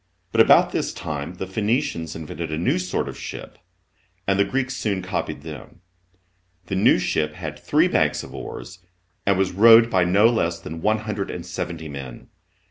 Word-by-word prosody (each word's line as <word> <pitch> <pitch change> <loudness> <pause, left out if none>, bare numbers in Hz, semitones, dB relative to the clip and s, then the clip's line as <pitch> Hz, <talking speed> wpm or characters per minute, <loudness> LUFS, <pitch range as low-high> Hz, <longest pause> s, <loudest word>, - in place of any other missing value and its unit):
But - - +5
about - - +6
this - - -2
time 75 +2 -5
the 95 - -5
Phoenicians 95 - -1
invented 80 0 -6
a 75 - -2
new 85 +2 +1
sort 90 0 -2
of - - -7
ship, - - -8 0.7
and 95 0 +1
the - - +6
Greeks 130 +4 -2
soon 100 -6 -2
copied 95 -5 -3
them. 80 +2 -10 0.8
The 95 - -3
new 95 - +5
ship 75 0 -1
had 75 -4 -6
three - - +3
banks - - +1
of - - -11
oars, 95 +1 -8 0.5
and 100 -1 +4
was, 95 -1 +1
rowed 115 +4 +7
by 90 -1 +3
no 100 +5 +4
less 85 -8 0
than 80 0 -8
one 110 +3 +2
hundred 105 -3 -4
and 85 - -6
seventy 85 -2 -5
men. 70 -4 -9
90 Hz, 180 wpm, -23 LUFS, 80-100 Hz, 0.8 s, rowed